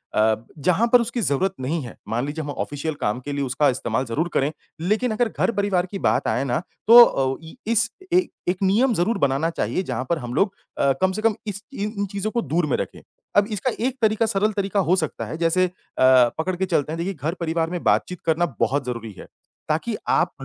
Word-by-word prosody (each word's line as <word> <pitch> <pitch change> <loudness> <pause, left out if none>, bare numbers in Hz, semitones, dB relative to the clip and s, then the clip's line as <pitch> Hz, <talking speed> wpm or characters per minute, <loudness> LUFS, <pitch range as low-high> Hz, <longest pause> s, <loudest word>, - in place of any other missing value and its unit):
अ, 110 +1 +4 0.2
जहाँ 180 +10 +2
पर 245 - +8
उसकी 235 +1 -2
ज़रूरत 185 +2 +1
नहीं 155 +6 -1
है, 120 - -9
मान 120 +4 -1
लीजिए 155 +2 -4
हम 145 - -6
ऑफ़िशियल 145 +2 -4
काम 105 +4 0
के 145 - -6
लिए 140 0 -1
उसका 135 +3 +2
इस्तेमाल 125 0 -1
ज़रूर 140 +8 -1
करें, 140 +2 +1 0.3
लेकिन 215 +7 +1
अगर 220 +2 +1
घर-परिवार 200 -5 0
की 195 - -4
बात - - +1
आए 130 - +1
ना, 125 -2 0 0.3
तो 240 +2 +11
अ, 135 - +1
इ 160 - -11 0.2
इस 230 0 +3 0.2
ए 365 -1 +4 0.2
एक 180 - +1
नियम 225 +7 +3
ज़रूर 200 +7 +1
बनाना 140 +4 +1
चाहिए, 185 +2 -2
जहाँ 130 -5 -3
पर 170 - +2
हम 120 -2 -6
लोग 195 +5 +1 0.2
अ, 140 - +4
कम 190 0 +3
से 215 - -3
कम 225 -1 +2
इस 200 -1 -5
इन 210 -2 -3
इन 200 - +1
चीज़ों 200 +2 -2
को 235 - 0
दूर 170 -4 0
में 145 - +1
रखें। - - -5 0.4
अब 205 0 +5
इसका 215 +5 -1 0.2
एक 265 0 -4
तरीका 220 0 +3
सरल 215 0 +1
तरीका 200 0 -1
हो - - +6
सकता 160 -5 -2
है, 155 - -6
जैसे 170 +2 +2
अ, - - -13 0.3
पकड़ 130 +7 +4
के 190 +2 -1
चलते 155 -5 0
हैं - - -4
देखिए 185 +4 -2
घर-परिवार 165 +2 -2
में 180 -1 -4
बातचीत 180 -2 +1
करना 165 +2 +2
बहुत 140 0 +1
ज़रूरी 115 -3 -5
है, - - -10 0.4
ताकि - - 0
आप - - +3
170 Hz, 225 wpm, -23 LUFS, 140-205 Hz, 0.4 s, तो